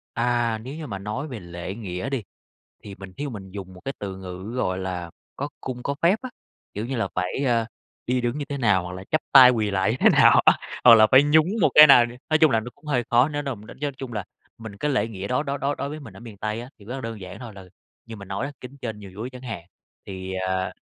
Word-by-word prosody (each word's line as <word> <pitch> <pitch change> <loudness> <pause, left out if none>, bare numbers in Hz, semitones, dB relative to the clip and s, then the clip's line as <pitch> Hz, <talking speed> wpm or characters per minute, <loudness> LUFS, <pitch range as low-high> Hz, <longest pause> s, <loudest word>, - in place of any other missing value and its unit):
À, 120 -1 +1
nếu 130 +6 -8
như 160 -2 -6
mà 100 -5 -5
nói 105 +9 -4
về 125 -5 -7
lễ 85 +2 -7
nghĩa 95 +1 -5
đi, 135 -4 -2 0.6
thì 100 - -8
mình 95 -1 -11
thí 145 - -5
dụ 140 - -4
mình 95 -4 -9
dùng 95 -1 -8
một 90 - -13
cái 135 - -3
từ 95 -2 -5
ngữ 95 +3 -8
gọi 95 -6 -1
là 90 -2 -4 0.3
"có 140 +2 -3
cung 125 -1 -6
có 140 - -2
phép" 175 +5 +5
á. 255 - -6 0.4
Kiểu 105 +3 -3
như 135 - -3
là, 110 -4 -1
phải, 90 +9 -2
a, 115 -2 +2 0.4
đi 125 +1 +1
đứng 120 +3 -2
như 145 - -3
thế 140 - -4
nào 105 -7 +3
hoặc 90 - -6
là 95 +1 -8
chắp 155 - +2
tay 130 -2 +10
quỳ 110 -4 0
lạy 95 +1 +1
như 115 - -1
thế - - +7
nào - - +6
á, - - +8 0.3
hoặc 120 - +10
là 110 -1 +7
phải 130 +2 +8
nhún 150 +2 +4
một 160 - +5
cái 150 0 +11
nào 125 -4 +7
nè. 120 - -10
Nói 155 - +4
chung 155 -1 +5
là 115 -3 +2
nó 120 +3 -8
cũng 150 +1 -22
hơi 125 -5 0
khó, 120 +3 +5
nếu 145 -1 -3
nà 135 -2 -3
mình 105 -1 -14
đánh - - -12
giá 145 - 0
chung 130 -3 -7
là 105 -3 -3 0.3
mình 110 -3 -9
cái 150 +8 -1
lễ 115 -5 +1
nghĩa 100 -3 -6
đó 125 +3 +1
đó 140 -1 -3
đó 140 +1 -1
đối 140 - -4
với 155 +2 -7
mình 110 -9 -12
ở - - -12
miền 115 -4 -11
Tây 110 +2 -3
á, 120 - -9
thì 100 - -16
rất 120 - -6
là 135 - -5
đơn 115 -3 -6
giản 90 +1 -9
thôi 120 -2 -9
là 95 -1 -11 0.4
như 115 -1 -8
mình 100 -2 -11
nói 100 +8 -2
á, 145 - -7
kính 130 +2 -10
trên 110 -3 -5
nhường 100 -2 -11
dưới 110 +6 -6
chẳng 125 -1 -11
hạn, 115 -9 -6 0.4
thì, 95 -1 -6
ờ 95 0 -1
115 Hz, 290 wpm, -24 LUFS, 100-135 Hz, 0.6 s, cái